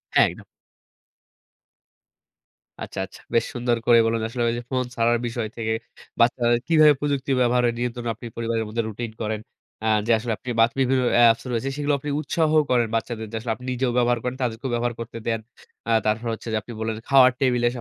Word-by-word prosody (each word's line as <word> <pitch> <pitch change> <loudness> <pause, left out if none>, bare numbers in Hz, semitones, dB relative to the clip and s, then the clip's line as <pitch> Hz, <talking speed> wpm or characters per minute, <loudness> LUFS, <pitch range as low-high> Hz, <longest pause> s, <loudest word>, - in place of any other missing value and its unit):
হ্যাঁ, - - +6
একদম। - - -12 2.4
আচ্ছা, - - -7
আচ্ছা। - - -15
বেশ 115 - +3
সুন্দর 120 -1 0
করে 120 -1 +6
বলুন। 115 0 0
আসলে 120 +1 -3
যে - - -4
ফোন 130 -1 0
ছাড়ার 120 +1 +2
বিষয় 115 -1 -3
থেকে 110 -1 -1 0.5
বাচ্চাদের 120 0 +3
কিভাবে 155 -2 +6
প্রযুক্তি 140 -2 -1
ব্যবহারের 120 -1 +2
নিয়ন্ত্রণে 120 -1 -3
আপনি 120 - -11
পরিবারের 115 -1 -1
মধ্যে 115 +2 -2
রুটিন 110 +1 -5
করেন। 110 0 -2 0.4
আ - - +1 0.2
যে - - +3
আসলে 115 +1 -2
আপনি 125 - -9
বা 115 - +8
বিভিন্ন 130 0 +2
অ্যাপস 115 -1 +5
রয়েছে 120 +3 -1
সেগুলো 145 0 0
আপনি 145 - -5
উৎসাহও 155 +1 +2
করেন 120 -2 +3
বাচ্চাদের 115 -1 -3
যে - - -6
আসলে 115 +1 -3
আপনি 125 - -12
নিজেও 125 0 0
ব্যবহার 120 0 +3
করেন, 125 0 -2
তাদেরকেও 120 +2 -3
ব্যবহার 120 0 0
করতে 115 0 -6
দেন। 115 -1 0 0.5
আ - - +2
তারপর 110 +2 0
হচ্ছে 115 - -8
যে - - +2
আপনি 120 - -10
বললেন 110 0 -2
খাওয়ার 130 -2 +7
টেবিলে 125 -3 +2
120 Hz, 185 wpm, -24 LUFS, 115-125 Hz, 2.4 s, বা